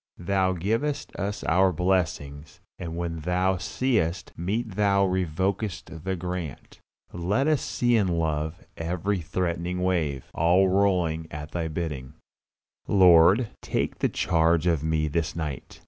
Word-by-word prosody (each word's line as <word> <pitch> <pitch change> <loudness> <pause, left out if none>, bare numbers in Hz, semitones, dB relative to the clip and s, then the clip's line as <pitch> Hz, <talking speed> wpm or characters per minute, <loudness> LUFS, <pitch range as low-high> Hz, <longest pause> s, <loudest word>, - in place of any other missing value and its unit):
Thou 95 +1 +1
givest 115 - -2
us 100 +1 -3
our 95 +3 +3
blessings; 80 -5 -1 0.2
and 85 -2 -5
when 85 -1 -3
Thou 90 +3 +1
seest 95 -3 -1
meet 105 +7 -2
Thou 100 0 +3
revokest 95 -1 -2
the 95 0 -1
grant. 90 -5 -6 0.3
Let 95 +10 0
us 155 -2 +2
see 120 -2 +2
love 80 -3 -1
in - - -21 0.2
every 90 +3 -1
threatening 90 +1 -2
wave, 80 -8 0
all 90 +4 +4
rolling 90 -5 +1
at 75 +1 -7
Thy 85 -2 -2
bidding. 75 -5 -5 0.7
Lord, 95 +4 +6
take - - -2
the - - +2
charge 85 -1 +2
of 85 -5 +2
me 80 -1 +1
this 80 +1 -2
night. 75 -6 -5
90 Hz, 130 wpm, -26 LUFS, 80-95 Hz, 0.7 s, Lord